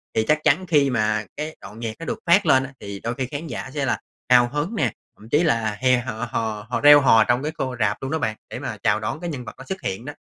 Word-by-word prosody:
thì 110 - +3
chắc 155 0 +3
chắn 155 +5 +3
khi 145 -4 +3
mà 110 -3 0
cái 155 +2 -4
đoạn 105 +2 -11
nhạc 115 -2 -4
nó 165 - -6
được - - -3
phát 175 +3 +5
lên 130 0 +4
á, 135 0 -8
thì 100 -1 -7
đôi 115 - -2
khi 130 - -2
khán 150 +3 -5
giả 140 - -6
sẽ 145 -2 -1
là 125 - 0 0.3
hào 120 -1 +6
hứng 150 - -3
nè, 130 - +1 0.3
thậm 110 - -15
chí 150 +7 +3
là 115 -9 +1
hè 130 -1 +4
h 125 - -7 0.2
hò 110 -2 -3
họ 125 - -1
reo 145 0 +9
hò 115 -5 +6
trong 120 +3 +1
cái 155 - -2
khô 130 -2 -2
rạp 105 -3 +1
luôn 135 - -4
đó 160 - 0
bạn, 110 -6 -1
để - - -6
mà - - -5
chào 105 +1 +3
đón 110 +7 -4
cái 175 - -4
nhân 130 -6 -6
vật - - -8
nó 135 - -10
xuất 190 +5 -5
hiện 95 +1 -4
đó. 145 - -6
130 Hz, 290 wpm, -23 LUFS, 110-150 Hz, 0.3 s, reo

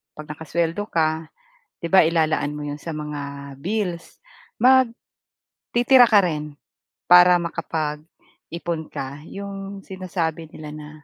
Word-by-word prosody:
'pag 155 0 -9
nakasweldo 165 +4 -2
ka, 160 -1 0 0.5
'di 170 - -2
ba 190 -4 +7
ilalaan 155 -3 +1
mo 150 - -6
'yun 145 0 -4
sa 165 +1 -6
mga 140 -2 -6
bills, 180 -1 -3 1.3
magtitira 245 0 +4
ka 210 -2 +6
rin 150 -3 -3 0.5
para 180 0 +8
makapag-ipon 165 0 -5
ka, 140 +2 -6
'yong 195 0 -7
sinasabi 170 -4 -3
nila 150 -1 -9
na. 150 0 -9
165 Hz, 115 wpm, -23 LUFS, 150-180 Hz, 1.3 s, para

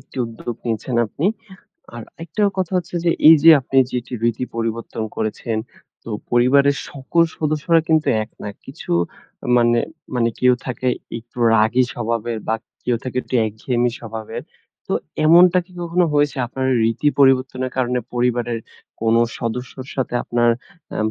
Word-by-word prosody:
একটি 130 - -20
উদ্যোগ 115 +1 -6
নিয়েছেন 120 +2 -2
আপনি। 150 - -2 0.7
আর 120 - -6 0.2
একটা 170 +6 -3 0.2
কথা 185 0 -1
হচ্ছে 175 0 -3
যে, 170 - +4 0.2
এইযে 160 0 +8
আপনি 135 +1 -4
যে 125 - -1
যে 125 - -5
রীতি 120 +2 0
পরিবর্তন 115 0 -3
করেছেন, 110 +1 -2 0.5
তো 115 - -9 0.2
পরিবারের 140 +3 +4
সকল 145 +5 +1 0.2
সদস্যরা 160 +2 +2
কিন্তু 160 -1 +3 0.2
এক 110 - -22
না। - - -4 0.2
কিছু 135 - -10 0.7
মানে 120 0 +4 0.4
মানে 115 -1 +2
কেউ 125 0 +5
থাকে 130 0 -2 0.3
একটু 120 +2 -15 0.2
রাগী 110 +4 +4
স্বভাবের 115 -1 -2
বা, 110 - +2 0.3
কেউ 120 -1 +1
থাকে 130 -1 -6
একটু - - -8
একঘেয়েমি 120 +3 -1
স্বভাবের। 110 -1 -7 0.4
তো, - - -3 0.3
এমনটা 175 +2 +7
কি 185 - -21
কখনো 175 +1 +1
হয়েছে? 145 -1 +2
আপনার 130 +2 -3 0.2
রীতি 115 +6 +1
পরিবর্তনের 130 -1 +3
কারণে 125 -1 +1 0.2
পরিবারের 120 -1 0 0.4
কোন 115 0 +2 0.2
সদস্যর 125 +3 -5
সাথে 130 -2 -2
আপনার 120 0 +2 0.4
আ - - -3
125 Hz, 150 wpm, -20 LUFS, 115-140 Hz, 0.7 s, এইযে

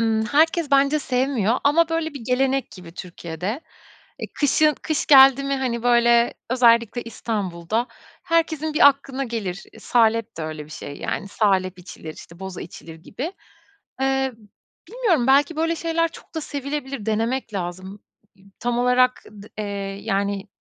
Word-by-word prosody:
Imm, 220 -1 +1
herkes 315 +4 +2
bence 280 +2 +4
sevmiyor 255 -5 0
ama, 315 +3 +4
böyle, 325 -2 -2
bir 280 - -7
gelenek 265 +2 0
gibi 180 -3 -12
Türkiye'de. 180 - -5 0.6
E, - - -3 0.2
kışın 300 +1 +3
kış 310 -2 -1
geldi 270 -1 +7
mi, 275 0 0
hani, 245 -3 -2
böyle, 235 -1 +4 0.2
özellikle 235 -1 +3
İstanbul'da 215 -1 -3 0.4
herkesin 315 -2 0
bir 285 - +8
aklına 275 -1 -2
gelir. 210 -6 -4
E, - - -15
salep 230 -2 +1
de - - -3
öyle 155 -1 -5
bir - - -18
şey, 145 -2 -8
yani, 200 - -4
salep 190 -3 +1
içilir, 165 -3 -10
işte, 170 - -13
boza 190 -2 -6
içilir 165 -1 -11
gibi. 255 - -6 0.7
Eee, 270 0 +1 0.6
bilmiyorum 405 - +1
belki 285 +4 +4
böyle 330 +1 0
şeyler 330 0 0
çok - - -15
da 320 - -2
sevilebilir, 280 -5 -5
denemek 225 +2 -1
lazım. 185 +2 -5 0.3
İ 190 - -24 0.2
tam 240 0 -1
olarak 250 +1 +3
d 205 -1 -12
eee, 200 -1 -4
yani, 200 -1 -1
240 Hz, 150 wpm, -22 LUFS, 200-280 Hz, 0.7 s, bir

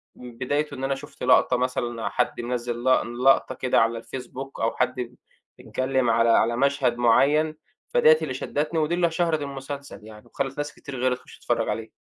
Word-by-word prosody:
من 120 -2 -11
بدايته 145 +4 -1
إن 130 - -7
أنا 135 0 0
شُفت 145 +1 -11
لقطة 125 - +4
مثلًا 120 -4 -2
حد 125 -1 -1
مِنَزِّل 120 0 -3
لق 130 - +5
لقطة 125 +3 +2
كده 130 -3 +2
على 115 0 0
الFacebook 135 +1 -7
أو 115 - +2
حد 125 -1 -1 0.5
اتكلّم 130 -2 0
على 115 +1 +3
على 115 +1 +3
مشهد 140 -3 +1
معيّن، 145 +6 +3 0.4
فديّة 475 -1 +6
اللي - - -3
شدّتني، 150 +3 -2
ودي 155 +2 +1
اللي 170 -2 +2
شهرت 165 -2 0
المسلسل 140 0 -7
يعني، 110 -1 -13
وخلِّت 135 0 -4
ناس 145 0 -3
كتير 140 -2 -9
غيري 125 0 +1
تخش - - -16
تتفرّج - - -1
عليه. - - -3
130 Hz, 180 wpm, -25 LUFS, 120-145 Hz, 0.5 s, فديّة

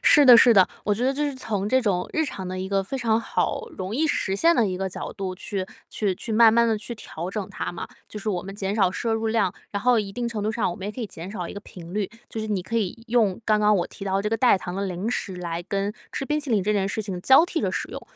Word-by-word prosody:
是 295 - +6
的 245 -2 +10
是 235 -2 +7
的， 190 -2 +7 0.2
我 205 - +2
觉 240 +4 -1
得 265 - +3
这 290 +1 -1
是 - - -7
从 205 -5 -2
这 260 +1 +3
种 180 -5 0
日 315 - +2
常 190 -9 -5
的 185 0 -4
一 190 - -3
个 195 0 +1
非 270 +8 -4
常 230 -2 +1
好 460 - -1
容 190 +3 -4
易 315 +4 +2
实 195 -9 0
现 335 +11 +4
的 225 - +4
一 185 - -2
个 195 - -1
角 185 - -6
度 190 -2 -4
去 190 0 -4 0.2
去 200 -4 0
去 225 - -6
慢 225 0 +7
慢 235 0 +5
地 220 -2 +1
去 235 +2 -7
调 175 -5 -6
整 200 -2 -3
它 - - -4
嘛， 175 - -6 0.2
就 210 - -7
是 210 +1 -2
我 180 -2 -2
们 195 +1 -8
减 200 0 -2
少 190 -4 +3
摄 225 +3 -2
入 225 0 -1
量， 220 -5 +1 0.2
然 200 0 -3
后 245 -2 +4
一 200 -2 -5
定 245 +2 -3
程 225 -3 -3
度 215 - 0
上 220 -4 0
我 - - -5
们 195 +1 -6
也 - - -2
可 235 - -12
以 - - -2
减 175 +1 -8
少 180 -5 -4
一 - - -7
个 200 - -7
频 175 -4 -11
率。 205 -2 -1 0.2
就 220 - -4
是 215 - -3
你 200 -4 -1
可 230 - -7
以 225 +3 -3
用 220 -6 +2
刚 215 -1 +3
刚 210 0 +4
我 175 - 0
提 - - -11
到 195 0 0
这 210 - -1
个 225 - +1
代 240 -3 +5
糖 180 0 -6
的 200 0 -2
零 185 +5 -3
食 190 -6 -3
来 170 -1 -4
跟 200 +2 -2 0.2
吃 270 - -3
冰 300 +2 0
淇 290 - -7
淋 210 -4 +3
这 210 +2 +1
件 195 -2 +1
事 215 +2 -2
情 190 -3 -5
交 270 - +6
替 340 -2 -2
着 - - 0
使 - - -3
用， - - -7
210 Hz, 330 characters per minute, -24 LUFS, 190-230 Hz, 0.2 s, 的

